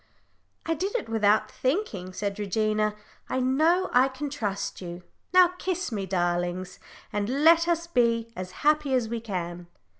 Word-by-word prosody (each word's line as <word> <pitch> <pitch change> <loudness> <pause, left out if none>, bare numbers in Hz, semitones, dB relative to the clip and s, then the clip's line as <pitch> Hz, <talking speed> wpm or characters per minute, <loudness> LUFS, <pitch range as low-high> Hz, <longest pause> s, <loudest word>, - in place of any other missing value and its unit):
"I 330 - +1
did 380 +8 -3
it 470 - -2
without 215 -1 +2
thinking," 255 - -2
said 200 +2 -4
Regina. 215 +1 0 0.3
"I 260 - 0
know 315 +9 +2
I 255 +2 +6
can 270 +2 -5
trust 205 -10 -3
you. 175 0 -7 0.3
Now 365 0 +7
kiss 365 -4 -2
me, 200 -3 -3
darlings, 175 0 -1 0.3
and 205 +1 -1 0.2
let 335 +1 +6
us 340 -1 +1
be 230 -7 +1
as 185 -3 -5 0.2
happy 300 -3 +3
as 235 -3 0
we 235 0 -2
can." 175 -5 -5
230 Hz, 155 wpm, -27 LUFS, 195-305 Hz, 0.3 s, Now